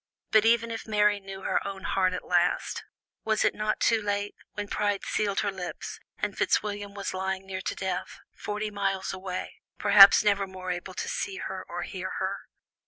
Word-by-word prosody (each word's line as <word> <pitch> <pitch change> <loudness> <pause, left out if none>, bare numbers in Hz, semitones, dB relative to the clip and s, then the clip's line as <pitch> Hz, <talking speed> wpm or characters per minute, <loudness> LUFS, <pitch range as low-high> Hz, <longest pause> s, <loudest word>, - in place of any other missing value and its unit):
And 220 -1 +7
even 230 0 +3
if 225 - -5
Mary 210 -1 +3
knew 195 0 -9
her - - +1
own 195 -1 -6
heart 185 -1 +1
at - - -5
last, 175 0 +1 0.4
was 220 -1 +2
it - - +3
not 215 0 -1
too 225 -1 +3
late, 205 0 -1 0.2
when 205 -1 -4
pride 205 -1 -1
sealed 200 -2 0
her 205 - 0
lips, 180 -2 -6 0.2
and - - -2
Fitzwilliam 205 -1 0
was 200 - -4
lying 190 0 -2
near 190 -1 -5
to - - -3
death, 190 -2 -3 0.2
forty 210 +1 -4
miles 195 -2 -1
away, 185 -1 -6 0.2
perhaps 200 -1 +9
never 200 -2 +2
more 185 -1 -5
able 180 +1 -5
to - - -3
see 455 -5 -2
her - - -5
or - - -4
hear - - -5
her? - - -2
200 Hz, 185 wpm, -28 LUFS, 190-210 Hz, 0.4 s, perhaps